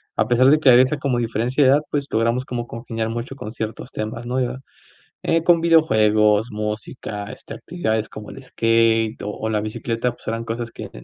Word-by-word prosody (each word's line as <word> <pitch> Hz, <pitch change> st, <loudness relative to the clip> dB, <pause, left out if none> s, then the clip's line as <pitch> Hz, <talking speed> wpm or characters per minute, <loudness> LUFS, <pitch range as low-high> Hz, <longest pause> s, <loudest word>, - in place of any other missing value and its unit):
a 110 Hz, -, +1 dB
pesar 125 Hz, +1 st, +4 dB
de 150 Hz, +3 st, +6 dB
que 145 Hz, -, +4 dB
había 120 Hz, +1 st, +8 dB
esa 140 Hz, +4 st, -1 dB
como 135 Hz, -3 st, -1 dB
diferencia 120 Hz, +4 st, 0 dB
de 130 Hz, -, +5 dB
edad, 145 Hz, +2 st, +4 dB
pues, 140 Hz, -1 st, -1 dB
logramos 115 Hz, +3 st, 0 dB
como 120 Hz, -2 st, -4 dB
congeniar 115 Hz, -1 st, -4 dB
mucho 120 Hz, +3 st, -5 dB
con 110 Hz, -5 st, -7 dB
ciertos 110 Hz, +3 st, -6 dB
temas, 115 Hz, +3 st, -5 dB
¿no? 125 Hz, +2 st, -1 dB
Ya, 125 Hz, +1 st, -2 dB, 0.6 s
eh, 165 Hz, 0 st, +1 dB
con 170 Hz, -1 st, +4 dB
videojuegos, 110 Hz, -9 st, +4 dB
música, 105 Hz, 0 st, -5 dB
este, -, -, -10 dB
actividades 110 Hz, -11 st, -2 dB
como 110 Hz, -1 st, -9 dB
el 135 Hz, -, -10 dB
skate, 115 Hz, -2 st, +2 dB
o 105 Hz, -, -3 dB
o 110 Hz, +1 st, -4 dB
la 105 Hz, -1 st, 0 dB
bicicleta, 115 Hz, +3 st, -2 dB
pues, -, -, -18 dB
eran 115 Hz, +1 st, -2 dB
cosas 115 Hz, +1 st, -4 dB
que -, -, -8 dB
115 Hz, 200 wpm, -21 LUFS, 110-130 Hz, 0.6 s, había